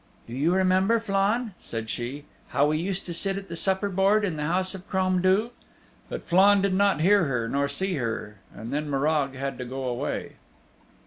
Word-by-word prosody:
"Do 115 - -10
you 145 +7 +1
remember, 190 +4 +3
Flann," 210 +2 0
said 115 -1 -5
she, 125 +6 -4 0.2
"how 145 - +2
we 155 0 0
used 190 +2 -3
to 175 - -4
sit 195 +3 -1
at 195 0 -8
the 170 - -5
supper 190 +3 +1
board 200 +2 +2
in 180 -5 -2
the 150 0 -2
house 185 +3 +1
of 190 0 -10
Crom 185 -1 +1
Duv?" 195 +6 +2 0.6
But - - -6
Flann 195 +3 +5
did 200 -1 +1
not 200 -4 +2
hear 200 +1 +4
her, 125 -5 -1
nor 140 +4 0
see 190 +7 -2
her, 110 -4 -4
and 115 +5 -8
then 150 +1 -2
Morag 140 -1 0
had 135 +1 -4
to - - -3
go 130 +2 -5
away. 125 -2 -3
180 Hz, 200 wpm, -26 LUFS, 140-195 Hz, 0.6 s, Flann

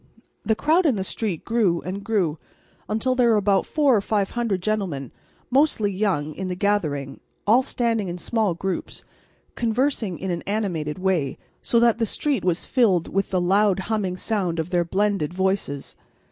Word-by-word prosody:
The 220 +1 +1
crowd 325 +8 +3
in 265 - +3
the 190 - -2
street 195 -3 -3
grew 215 -7 +1
and 195 +2 -5
grew 185 -9 0 0.5
until 225 +5 +1
there 250 -2 +3
were 225 - +5
about 200 -2 +2
four 290 -5 +3
or 205 - +2
five 200 -1 0
hundred 225 -7 -1
gentlemen, 185 - -2 0.4
mostly 260 -7 +3
young, 185 -7 -1
in 190 +3 -5
the 180 - -3
gathering, 155 -9 -1 0.3
all 230 +5 +5
standing 230 -5 -1
in 175 0 -4
small 210 -1 0
groups, 190 +2 -4 0.5
conversing 230 - 0
in 190 0 -3
an 170 -1 -2
animated 180 -8 -2
way, 185 -8 0 0.2
so 235 - +2
that 235 -1 +4
the 225 - +1
street 275 -1 -1
was 180 -1 0
filled 200 -10 +2
with 195 +1 -1
the 185 - +1
loud 195 +2 +3
humming 195 -4 -1
sound 185 -5 -1
of 160 +2 -3
their 175 -1 +2
blended 190 -2 0
voices. 190 -7 -1
200 Hz, 175 wpm, -23 LUFS, 180-225 Hz, 0.5 s, were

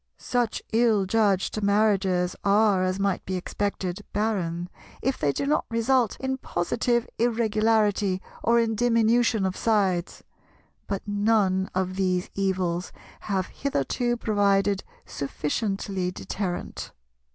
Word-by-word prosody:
Such 245 -3 -1
ill 225 -4 +3
judged 205 0 +1
marriages 195 -3 +2
are, 200 -1 +4
as 185 +1 -1
might 195 -2 0
be 185 - -3
expected, 190 +1 -3
barren, 180 -5 -1 0.3
if 265 +1 -1
they 145 - +2
do 280 - -2
not 295 +2 +1
result 230 0 +1
in 265 0 -2
positive 235 +5 0
Irregularity 215 -4 +2 0.2
or 235 +1 +3
in 225 -1 +1
diminution 230 -1 +2
of 190 0 -1
sides; 195 -6 0 0.6
but 200 0 -4
none 205 -2 +2
of 185 0 -1
these 185 -2 0
evils 185 -3 -1 0.3
have 190 -3 -1
hitherto 240 - -1
provided 200 -2 +2 0.2
sufficiently 190 +6 -2
deterrent. 180 0 -5
205 Hz, 115 wpm, -26 LUFS, 185-225 Hz, 0.6 s, are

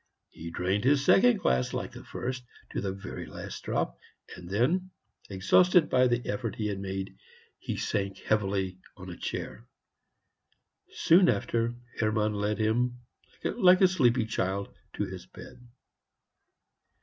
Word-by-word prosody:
He 85 - -8
drained 90 +4 -1
this 140 +2 +3
second 245 +3 +6
glass, 65 0 +1
like - - -3
the - - -11
first, 125 +1 -5 0.3
to - - -2
the 95 -1 -2
very 95 0 -7
last - - -8
drop; - - -2 0.4
and 85 -1 -11
then, 155 - +1 0.4
exhausted 160 - +4
by 125 0 +5
the 120 -1 -1
effort 110 0 -3
he 110 - -3
had 100 -1 -3
made, 95 0 -5 0.4
he - - -4
sank 100 -1 -2
heavily 95 -3 -1 0.2
on 95 -1 -8
a - - -7
chair. - - -6 1.2
Soon 175 +2 +4
after, 115 0 0 0.2
Hermann 110 -1 +1
led 105 +1 -1
him, 120 +3 0 0.4
like 185 -4 +4
a 190 - +8
sleepy 125 -10 +2
child, 100 -2 -2 0.2
to - - -2
his - - -9
bed. 125 - -13
110 Hz, 140 wpm, -29 LUFS, 95-130 Hz, 1.2 s, a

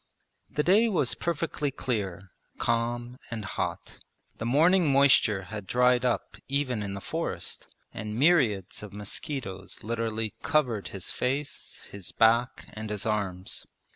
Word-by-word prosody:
The 150 - 0
day 210 +7 +5
was 150 - +2
perfectly 160 -3 -1
clear, 100 -9 -3 0.3
calm, 120 +2 -1
and 110 -3 -4
hot. - - -4 0.4
The 115 - -2
morning 165 +5 +5
moisture 130 -7 +5
had 105 0 -7
dried 125 +2 +4
up 125 -2 0
even 135 -5 0
in 100 -1 -3
the 100 - -6
forest, - - -4 0.3
and 105 0 -5
myriads 125 - +3
of 105 -2 -9
mosquitoes 105 - -5
literally 115 -1 -2
covered 125 -10 +1
his 95 -3 -4
face, 135 +3 -3
his 100 -3 -5
back, 115 +3 +3
and 110 0 -5
his 105 -2 -3
arms. 100 -4 -2
115 Hz, 135 wpm, -28 LUFS, 105-140 Hz, 0.4 s, day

